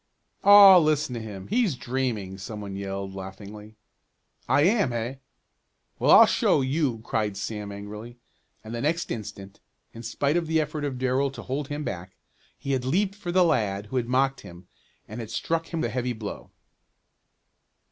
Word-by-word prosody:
"Aw, 200 -2 +10
listen 155 -4 +1
to 115 - -4
him! 100 -4 -8
He's 220 - +1
dreaming!" 120 -7 -3
some 105 +2 -7
one 100 -2 -6
yelled, 95 0 -5
laughingly. 100 +3 -9 0.7
"I 145 - +4
am; 200 - +3
eh? 120 +3 -3 0.8
Well, - - +1
I'll - - +9
show - - +2
you!" 130 -4 -1
cried 105 -4 -2
Sam 105 0 -5
angrily, 105 +4 -9 0.5
and 110 +1 -8
the 120 - -3
next 165 +4 -1
instant, 100 -3 -7 0.3
in 115 - -9
spite 140 +7 0
of 170 -2 -1
the 160 0 +2
effort 150 -1 -2
of 135 -3 -3
Darrell 130 +2 +1
to 135 - -9
hold 135 +2 -3
him 145 +1 -4
back, 90 -6 -6 0.4
he 140 - -4
had 130 -2 0
leaped 190 +10 +1
for 200 -4 -6
the 185 +1 +4
lad 105 -10 0
who 130 +5 -4
had 120 -2 -1
mocked 135 +1 +1
him, 85 +1 -13 0.4
and 110 +3 -8
had 115 -2 -6
struck 165 +5 -2
him 165 -2 -3
a 120 - 0
heavy 125 +1 -2
blow. 110 -3 -7
125 Hz, 175 wpm, -26 LUFS, 105-150 Hz, 0.8 s, Aw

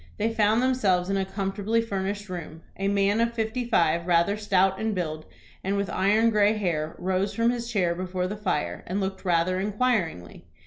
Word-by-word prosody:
They 225 +2 0
found 220 +2 +3
themselves 195 -8 +2
in 195 - +1
a 190 - 0
comfortably 200 +3 -1
furnished 205 -2 -3
room. 165 -3 -7
A 195 - -2
man 200 +2 +2
of 235 0 0
fifty 225 +2 -1
five, 170 -6 +2
rather 175 +3 +3
stout 190 -2 +2
in 220 -1 -1
build, 155 -3 -4 0.4
and 195 +1 0
with 200 0 -2
iron 215 +4 +3
gray 210 0 +4
hair, 165 -6 -2
rose 190 +2 -1
from 230 +1 +3
his 235 -1 -4
chair 180 -6 +1
before 180 +1 -3
the 195 +3 -3
fire, 205 -8 -2
and 185 +3 -2
looked 190 -1 -3
rather 180 0 +1
inquiringly. 200 - -1
195 Hz, 185 wpm, -26 LUFS, 180-215 Hz, 0.4 s, gray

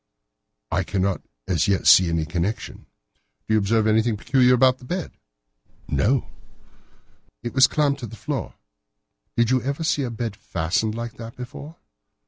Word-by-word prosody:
"I - - +1
cannot 95 -1 -1 0.3
as - - +1
yet 100 -2 +1
see 90 -2 +7
any 80 -1 0
connection." 85 +7 -4 0.6
"Did 110 - -1
you - - +5
observe 110 +2 +1
anything 110 0 +2
very - - -17
peculiar 125 -2 +5
about 130 +1 +4
that 125 - -13
bed?" 180 +1 -3 0.8
"No." 125 +4 +1 1.2
"It 120 - -4
was 130 0 +6
clamped 145 -2 +1
to 120 - -6
the 110 - -10
floor. - - -4 0.8
Did 115 0 +3
you 130 -1 +3
ever 140 +6 -3
see 155 -2 +1
a 130 - -2
bed 115 -2 -4
fastened 95 +6 -1
like 115 0 -6
that 115 0 -9
before?" 140 +5 -9
115 Hz, 160 wpm, -23 LUFS, 105-130 Hz, 1.2 s, see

